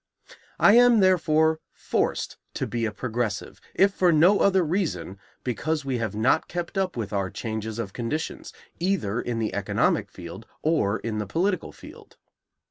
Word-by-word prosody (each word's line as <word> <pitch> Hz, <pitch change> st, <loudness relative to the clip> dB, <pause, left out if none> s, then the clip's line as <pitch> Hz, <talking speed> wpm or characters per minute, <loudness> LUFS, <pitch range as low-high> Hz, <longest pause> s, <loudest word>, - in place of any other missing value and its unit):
I 200 Hz, -, +7 dB
am, 245 Hz, -2 st, +6 dB
therefore, 160 Hz, -4 st, +3 dB
forced -, -, -2 dB, 0.2 s
to -, -, -1 dB
be 115 Hz, -1 st, -2 dB
a 110 Hz, -, -1 dB
progressive, 110 Hz, -2 st, -3 dB
if 195 Hz, +1 st, +4 dB
for 180 Hz, -3 st, +3 dB
no 175 Hz, +6 st, +5 dB
other 190 Hz, -2 st, +4 dB
reason, 165 Hz, -, -2 dB, 0.2 s
because 145 Hz, +5 st, -2 dB
we 130 Hz, -3 st, -1 dB
have 110 Hz, -3 st, -3 dB
not 110 Hz, +5 st, +2 dB
kept 175 Hz, +3 st, -5 dB
up 190 Hz, -7 st, -1 dB
with 110 Hz, -3 st, -4 dB
our 100 Hz, -2 st, -1 dB
changes 110 Hz, +1 st, -5 dB
of 105 Hz, -5 st, -4 dB
conditions, 150 Hz, +7 st, -4 dB, 0.3 s
either 170 Hz, -, 0 dB
in 120 Hz, -1 st, -3 dB
the 110 Hz, -2 st, -2 dB
economic 100 Hz, -1 st, 0 dB
field 90 Hz, +5 st, -10 dB, 0.2 s
or 130 Hz, -10 st, +2 dB
in 110 Hz, -2 st, -4 dB
the 105 Hz, -, -3 dB
political 185 Hz, -, -1 dB
field. -, -, -14 dB
130 Hz, 160 wpm, -25 LUFS, 110-175 Hz, 0.3 s, I